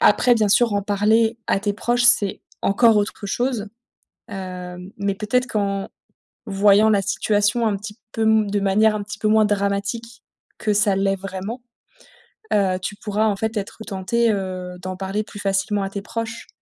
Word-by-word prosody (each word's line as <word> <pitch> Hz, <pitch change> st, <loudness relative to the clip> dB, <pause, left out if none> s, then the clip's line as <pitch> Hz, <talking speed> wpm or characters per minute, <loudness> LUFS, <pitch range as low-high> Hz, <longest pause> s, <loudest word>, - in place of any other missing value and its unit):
Après 245 Hz, +4 st, +5 dB
bien 215 Hz, -2 st, +2 dB
sûr, 225 Hz, +2 st, +4 dB
en 200 Hz, -, 0 dB
parler 220 Hz, +3 st, +2 dB
à 195 Hz, -, +1 dB
tes 205 Hz, -1 st, -1 dB
proches, 240 Hz, +3 st, 0 dB
c'est 210 Hz, -5 st, +4 dB, 0.2 s
encore 220 Hz, +2 st, +4 dB
autre 205 Hz, 0 st, -1 dB
chose. 235 Hz, 0 st, -1 dB, 0.6 s
Hem, 180 Hz, -1 st, -7 dB
mais 200 Hz, -1 st, -1 dB
peut-être 250 Hz, +5 st, 0 dB
qu'en 200 Hz, -3 st, -2 dB, 0.6 s
voyant 200 Hz, +2 st, +4 dB
la 205 Hz, -2 st, +3 dB
situation 210 Hz, +3 st, +1 dB
un 200 Hz, -2 st, 0 dB
petit 210 Hz, +2 st, -9 dB
peu 225 Hz, -, -2 dB
m 220 Hz, -2 st, +3 dB
de 205 Hz, 0 st, 0 dB
manière 215 Hz, +2 st, +3 dB
un 205 Hz, -, -3 dB
petit 210 Hz, 0 st, -8 dB
peu 215 Hz, -, 0 dB
moins 215 Hz, 0 st, +4 dB
dramatique 205 Hz, +3 st, -2 dB, 0.3 s
que 210 Hz, -2 st, 0 dB
ça 205 Hz, -1 st, +3 dB
l'est 195 Hz, 0 st, +1 dB
vraiment, 195 Hz, +5 st, -6 dB, 0.9 s
heu, 190 Hz, -3 st, +2 dB
tu 205 Hz, -, -4 dB
pourras 210 Hz, +1 st, -1 dB
en 205 Hz, -, +1 dB
fait 220 Hz, +2 st, -3 dB
être 200 Hz, -1 st, -5 dB
tentée, 225 Hz, +3 st, 0 dB
heu, 185 Hz, -2 st, -4 dB
d'en 185 Hz, 0 st, -5 dB
parler 195 Hz, +3 st, -2 dB
plus 205 Hz, -1 st, -11 dB
facilement 200 Hz, +1 st, 0 dB
à 195 Hz, -, -3 dB
tes 200 Hz, 0 st, -5 dB
proches. 230 Hz, +2 st, -5 dB
205 Hz, 175 wpm, -22 LUFS, 195-220 Hz, 0.9 s, Après